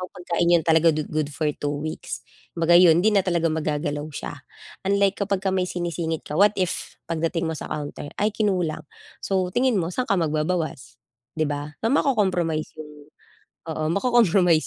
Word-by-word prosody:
kung 185 Hz, -, -7 dB
pagkain 175 Hz, -1 st, 0 dB
'yon 170 Hz, -2 st, +4 dB
talaga 165 Hz, 0 st, +4 dB
good 155 Hz, -1 st, -2 dB
for 155 Hz, -, -3 dB
2 145 Hz, 0 st, -2 dB
weeks, 155 Hz, +2 st, -5 dB, 0.3 s
kumbaga 165 Hz, +1 st, +2 dB
'yon 175 Hz, -1 st, +6 dB
hindi 220 Hz, -, +5 dB
na 200 Hz, -, +5 dB
talaga 170 Hz, -2 st, +1 dB
magagalaw 150 Hz, -1 st, -2 dB
siya. -, -, -5 dB, 0.6 s
Unlike 200 Hz, 0 st, +2 dB
kapagka 195 Hz, -1 st, 0 dB
may 185 Hz, -1 st, +1 dB
sinisingit 170 Hz, -2 st, -3 dB
ka 150 Hz, -, -3 dB
what 205 Hz, +1 st, +5 dB
if 185 Hz, -2 st, -2 dB
pagdating 165 Hz, +1 st, -1 dB
mo 160 Hz, -, -3 dB
sa -, -, -6 dB
counter 145 Hz, -1 st, -5 dB
ay 210 Hz, +1 st, +2 dB
kinulang, 185 Hz, -7 st, -1 dB, 0.4 s
so 185 Hz, -2 st, 0 dB
tingin 250 Hz, 0 st, +2 dB
mo 165 Hz, -, -2 dB
saan 255 Hz, +6 st, -2 dB
ka 200 Hz, -, +3 dB
magbabawas 155 Hz, -6 st, -2 dB, 0.4 s
'di 155 Hz, -, +1 dB
ba 145 Hz, +1 st, -4 dB
na -, -, +3 dB
mako-compromise 185 Hz, -, +1 dB
'yong 150 Hz, -1 st, -9 dB, 0.8 s
oo, 155 Hz, 0 st, -3 dB
mako-compromise 195 Hz, -7 st, +3 dB
170 Hz, 170 wpm, -24 LUFS, 155-190 Hz, 0.8 s, yon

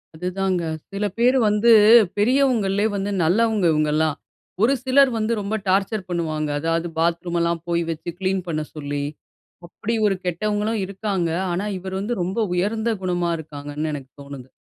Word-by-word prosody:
அதுதாங்க. 180 Hz, +1 st, -1 dB, 0.3 s
சில 200 Hz, +1 st, -2 dB
பேரு 250 Hz, +3 st, +4 dB
வந்து 210 Hz, +3 st, +4 dB, 0.5 s
பெரியவங்கள்லே 215 Hz, -4 st, +2 dB
வந்து 200 Hz, +1 st, -2 dB
நல்லவங்க 210 Hz, +2 st, +2 dB
இவுங்கல்லாம். 155 Hz, 0 st, +1 dB, 0.4 s
ஒரு 245 Hz, +5 st, +4 dB
சிலர் 265 Hz, +1 st, +4 dB
வந்து 220 Hz, +1 st, 0 dB
ரொம்ப 200 Hz, +2 st, -2 dB
டார்ச்சர் 195 Hz, +1 st, 0 dB
பண்ணுவாங்க. 155 Hz, -3 st, -2 dB
அதாவது 165 Hz, +2 st, -1 dB
பாத்ரூம் 170 Hz, +1 st, 0 dB
எல்லாம் 170 Hz, -1 st, -1 dB
போய் 170 Hz, 0 st, +1 dB
வைச்சு 165 Hz, +1 st, -4 dB
கிளீன் 190 Hz, -1 st, -1 dB
பண்ண 155 Hz, -2 st, -2 dB
சொல்லி, 145 Hz, -1 st, -3 dB, 0.6 s
அப்டி 230 Hz, +6 st, -3 dB
ஒரு 195 Hz, -, +1 dB
கெட்டவங்களும் 210 Hz, +4 st, -1 dB
இருக்காங்க. 195 Hz, -3 st, -2 dB, 0.2 s
ஆனா 190 Hz, +4 st, -2 dB
இவரு 190 Hz, +1 st, -6 dB
வந்து 225 Hz, +1 st, -3 dB
ரொம்ப 190 Hz, +5 st, -2 dB, 0.2 s
உயர்ந்த 220 Hz, +5 st, 0 dB
குணமா 175 Hz, -2 st, 0 dB
இருக்காங்கனு 150 Hz, 0 st, -5 dB
எனக்கு 135 Hz, -2 st, -7 dB
தோணுது. 135 Hz, -2 st, -10 dB
185 Hz, 145 wpm, -22 LUFS, 165-210 Hz, 0.6 s, பேரு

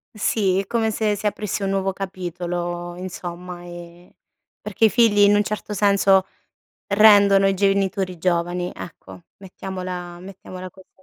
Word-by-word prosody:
Sì, 200 Hz, -3 st, +1 dB
è 195 Hz, -, -3 dB
come 225 Hz, -2 st, 0 dB
se 210 Hz, -1 st, 0 dB
si 205 Hz, -, -8 dB
aprisse 205 Hz, -1 st, -3 dB
un 195 Hz, -, -1 dB
nuovo 195 Hz, 0 st, -1 dB
capitolo 175 Hz, -2 st, -5 dB
insomma, 180 Hz, -1 st, -7 dB
ehm, 175 Hz, 0 st, -12 dB, 0.5 s
perché 210 Hz, +2 st, +1 dB
i -, -, +5 dB
figli 225 Hz, -2 st, +3 dB
in 205 Hz, 0 st, +6 dB
un 205 Hz, -, +3 dB
certo 210 Hz, 0 st, -5 dB
senso 195 Hz, -1 st, +3 dB, 0.6 s
rendono 200 Hz, -1 st, +6 dB
i 195 Hz, -, +1 dB
genitori 195 Hz, -1 st, 0 dB
giovani, 175 Hz, +1 st, -1 dB
ecco. 95 Hz, -, -11 dB
Mettiamola 180 Hz, -2 st, -7 dB
mettiamola 185 Hz, -1 st, -10 dB
così. 190 Hz, +1 st, -19 dB
190 Hz, 140 wpm, -22 LUFS, 175-200 Hz, 0.6 s, in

